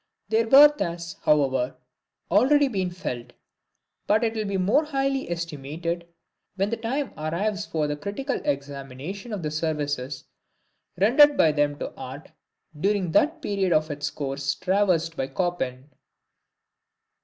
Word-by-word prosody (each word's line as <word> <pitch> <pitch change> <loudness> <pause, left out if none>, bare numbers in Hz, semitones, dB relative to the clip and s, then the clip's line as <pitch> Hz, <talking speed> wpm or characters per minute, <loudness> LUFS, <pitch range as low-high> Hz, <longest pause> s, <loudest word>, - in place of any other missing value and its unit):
Their 225 +1 +2
worth 290 +4 +8
has, 170 -2 -3
however, 135 -4 +2 0.6
already 275 +9 +5
been 190 -7 -1
felt; 125 -9 -6 0.7
but 215 +3 +3
it 225 -1 +1
will 215 -1 -2
be 200 -1 -1
more 200 +11 +3
highly 275 - -1
estimated 170 +1 -4 0.5
when 195 +2 0
the 230 - -1
time 260 +5 -3
arrives 195 +7 -2
for 155 -2 -1
a 150 0 -2
critical 200 - -3
examination 140 - -5
of 200 -5 -4
the 150 - -2
services 145 -4 -2 0.7
rendered 275 +10 +6
by 160 - +5
them 145 -1 0
to - - -5
art 135 +3 -9 0.5
during 195 -1 +1
that 315 - +2
period 195 -5 +1
of 155 0 +1
its 145 0 -3
course 140 -1 -3
traversed 180 -4 +1
by 135 - -2
Chopin. 135 -4 -3
170 Hz, 135 wpm, -25 LUFS, 145-210 Hz, 0.7 s, worth